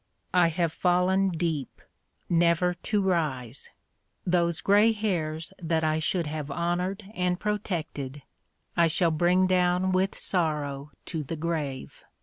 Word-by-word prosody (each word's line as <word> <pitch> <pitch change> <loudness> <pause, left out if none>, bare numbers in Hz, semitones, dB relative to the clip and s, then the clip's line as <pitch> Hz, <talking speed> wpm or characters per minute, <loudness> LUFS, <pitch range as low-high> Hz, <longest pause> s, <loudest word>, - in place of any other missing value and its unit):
I 180 -2 +5
have 165 -1 0
fallen 185 +2 +2
deep 165 -5 -3 0.5
never 170 +1 +3
to 205 +4 -1
rise. 140 -9 -1 0.6
Those 170 -2 +1
gray 210 +3 +4
hairs 170 -6 -2
that 165 -1 0
I 155 0 +1
should 170 +2 0
have 150 -1 -4
honored 180 +6 -2
and 180 -2 0
protected 160 -10 -3 0.5
I 170 -1 +4
shall 165 +1 +2
bring 175 +4 +3
down 180 0 +2
with 185 +1 +1
sorrow 150 -5 -1 0.2
to 160 -3 -3
the 150 +3 -5
grave. 150 -5 -4
170 Hz, 130 wpm, -27 LUFS, 155-185 Hz, 0.6 s, I